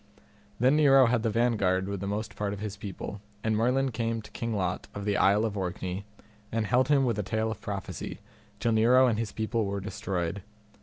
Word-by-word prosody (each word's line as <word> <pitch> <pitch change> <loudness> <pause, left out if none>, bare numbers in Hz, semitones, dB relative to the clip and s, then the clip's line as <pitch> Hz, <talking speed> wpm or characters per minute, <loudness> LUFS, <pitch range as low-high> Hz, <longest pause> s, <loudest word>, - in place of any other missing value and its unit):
Then 130 +5 +4
Nero 135 -3 +7
had 120 -1 +2
the 115 - +1
vanguard 105 -5 +1
with 100 -1 -3
the 100 - -4
most 105 +2 -3
part 100 -1 -2
of 100 - -6
his 105 -1 -4
people, 100 0 -7 0.2
and 110 -1 +1
Merlin 130 +4 +2
came 115 0 -1
to - - -13
King 115 -1 -3
Lot 90 -3 -2
of 100 0 -5
the 105 -1 +1
Isle 100 +3 +4
of 105 -2 -2
Orkney, 95 0 -3 0.5
and 115 -1 0
held 125 +3 +3
him 140 -2 +4
with 115 -4 0
a - - +2
tale 110 +2 -1
of 110 -1 -7
prophecy, 100 -2 -5 0.4
till 115 - +1
Nero 120 +4 +5
and 115 -4 +1
his 115 -2 -2
people 110 +1 -1
were 100 0 -2
destroyed. 95 -2 -3
110 Hz, 210 wpm, -28 LUFS, 100-115 Hz, 0.5 s, Nero